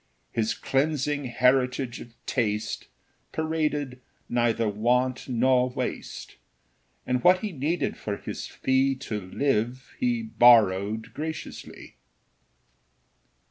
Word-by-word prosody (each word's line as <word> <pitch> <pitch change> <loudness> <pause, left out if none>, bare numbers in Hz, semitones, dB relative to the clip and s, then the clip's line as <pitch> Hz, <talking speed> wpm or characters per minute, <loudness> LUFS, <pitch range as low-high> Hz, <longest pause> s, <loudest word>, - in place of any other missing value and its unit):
His 110 -1 0
cleansing 145 0 0
heritage 125 0 +1
of 115 -1 -12
taste 105 -3 -1 0.4
Paraded 150 -5 -1 0.3
neither 115 -2 +1
want 125 +5 0
nor 125 +1 +3
waste; 125 - -5 0.7
And 125 -1 0
what 185 +1 +6
he 215 - -3
needed 155 +3 -1
for 100 -1 -4
his - - -6
fee 135 +1 +1
To 115 -5 -5
live, 120 +4 -1
he 240 -2 +1
borrowed 110 - +4
graciously. 160 0 -7
125 Hz, 100 wpm, -26 LUFS, 115-145 Hz, 0.7 s, what